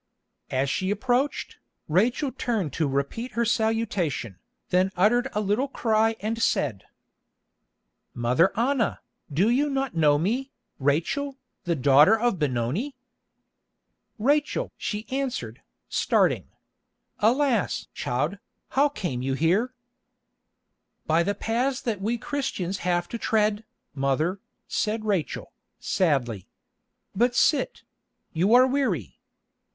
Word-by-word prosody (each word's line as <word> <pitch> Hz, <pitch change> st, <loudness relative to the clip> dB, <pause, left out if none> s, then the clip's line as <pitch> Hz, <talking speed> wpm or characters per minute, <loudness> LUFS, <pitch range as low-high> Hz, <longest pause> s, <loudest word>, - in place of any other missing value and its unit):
As 130 Hz, +1 st, 0 dB
she 185 Hz, +7 st, -1 dB
approached, 250 Hz, +7 st, 0 dB, 0.3 s
Rachel 240 Hz, -, +2 dB
turned 220 Hz, -, -2 dB
to 155 Hz, -, 0 dB
repeat 140 Hz, -, -2 dB
her 235 Hz, +1 st, +1 dB
salutation, 215 Hz, -, -1 dB, 0.3 s
then 185 Hz, +1 st, +3 dB
uttered 230 Hz, +7 st, +3 dB
a 210 Hz, -, 0 dB
little 210 Hz, +7 st, +1 dB
cry 225 Hz, -4 st, +1 dB
and 225 Hz, +2 st, -2 dB
said: 120 Hz, -, 0 dB, 1.3 s
"Mother 125 Hz, +10 st, +3 dB
Anna, 245 Hz, -1 st, +1 dB, 0.3 s
do 170 Hz, +9 st, +2 dB
you 285 Hz, +4 st, +2 dB
not 270 Hz, -2 st, -1 dB
know 150 Hz, -3 st, +4 dB
me, 240 Hz, -, -1 dB, 0.3 s
Rachel, 170 Hz, -, 0 dB, 0.3 s
the 170 Hz, -1 st, +1 dB
daughter 145 Hz, -, +5 dB
of 235 Hz, -6 st, +1 dB
Benoni?" 145 Hz, -, -1 dB, 1.2 s
"Rachel!" 285 Hz, +6 st, +1 dB
she 210 Hz, +1 st, -4 dB
answered, 270 Hz, -1 st, -3 dB, 0.3 s
starting. -, -, +1 dB, 0.7 s
"Alas! 240 Hz, 0 st, +2 dB
child, 150 Hz, +11 st, -2 dB, 0.3 s
how 285 Hz, +2 st, +3 dB
came 170 Hz, -, -4 dB
you 135 Hz, +1 st, -1 dB
here?" 195 Hz, -, +1 dB, 1.3 s
"By 160 Hz, +2 st, +3 dB
the 200 Hz, +4 st, 0 dB
paths 250 Hz, +4 st, 0 dB
that 215 Hz, -5 st, -3 dB
we 225 Hz, +4 st, 0 dB
Christians 230 Hz, -8 st, -3 dB
have 175 Hz, -1 st, 0 dB
to 235 Hz, -, -5 dB
tread, 215 Hz, -1 st, +1 dB, 0.3 s
mother," 145 Hz, +7 st, 0 dB, 0.3 s
said 215 Hz, +1 st, -1 dB
Rachel, 195 Hz, -, -2 dB, 0.3 s
sadly. 130 Hz, -, 0 dB, 0.7 s
"But 240 Hz, +4 st, +2 dB
sit; 295 Hz, -3 st, +2 dB, 0.5 s
you 185 Hz, +8 st, +4 dB
are 255 Hz, +1 st, +8 dB
weary. 250 Hz, -, -1 dB
210 Hz, 115 wpm, -26 LUFS, 160-245 Hz, 1.3 s, are